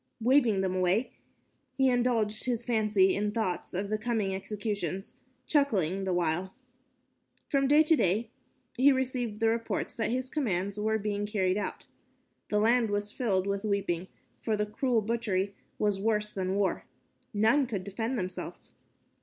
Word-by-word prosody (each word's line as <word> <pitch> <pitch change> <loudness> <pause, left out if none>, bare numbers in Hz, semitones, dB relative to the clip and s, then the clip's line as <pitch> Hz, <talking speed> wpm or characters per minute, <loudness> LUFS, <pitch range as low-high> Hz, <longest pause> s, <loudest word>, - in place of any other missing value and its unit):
Waving 235 -4 +3
them 190 -1 0
away, 185 +6 +1 0.7
he 265 -1 +4
indulged 240 -4 +1
his 240 -2 -1
fancy 215 -5 +3
in 205 +1 0
thoughts 205 -5 -1
of 200 +3 -2
the 215 - 0
coming 215 -4 -1
executions, 195 -2 -4 0.3
chuckling 195 - +1
the 190 - -1
while. 175 +2 +1 0.9
From 275 -1 +2
day 295 +3 +6
to 320 +1 +5
day 220 - +1 0.4
he 265 +3 +5
received 250 -4 -1
reports 225 +1 0
that 225 - -1
his 255 +2 -2
commands 200 - -1
were 220 +1 +1
being 205 -1 -2
carried 190 -3 +1
out. 210 - -4 0.6
The 210 - +1
land 230 +1 +3
was 205 0 -1
filled 205 -8 0
with 200 0 -2
weeping, 195 -4 -1 0.3
for 220 -2 0
the 210 - 0
cruel 225 +1 0
butchery 205 -3 -1 0.2
was 205 -2 0
worse 210 -1 +1
than 190 0 -2
war. 200 -1 0 0.5
None 225 +6 +3
could 200 -6 -3
defend 225 +6 -3
themselves. 185 -2 -5
210 Hz, 150 wpm, -29 LUFS, 195-235 Hz, 0.9 s, day